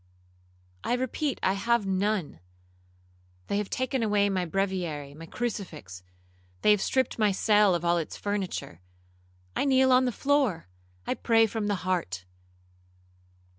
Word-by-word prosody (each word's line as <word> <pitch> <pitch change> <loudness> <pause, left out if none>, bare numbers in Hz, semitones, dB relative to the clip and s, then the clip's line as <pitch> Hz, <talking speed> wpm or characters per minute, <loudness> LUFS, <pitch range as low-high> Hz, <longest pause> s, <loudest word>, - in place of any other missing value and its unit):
'—'I - - 0
repeat 260 +3 -2
I 190 - +3
have 230 +2 +1
none. 190 - -1 1.1
They 200 - +1
have 210 - -3
taken 260 0 -1
away 205 -2 +2
my 185 -2 0
breviary, 175 -6 -2
my 165 +3 -10
crucifix;—they 90 - -4
have 210 -2 +3
stript 260 -3 0
my 210 -2 +4
cell 205 -1 +4
of 170 0 -3
all 170 0 +3
its 160 - -5
furniture. 195 - -4 0.7
I - - +1
kneel 265 -1 +4
on 255 0 +5
the 250 - +1
floor—I 160 - -1
pray 225 -1 +3
from 220 -1 -3
the 205 - +1
heart. 95 - -2
195 Hz, 135 wpm, -28 LUFS, 155-225 Hz, 1.1 s, on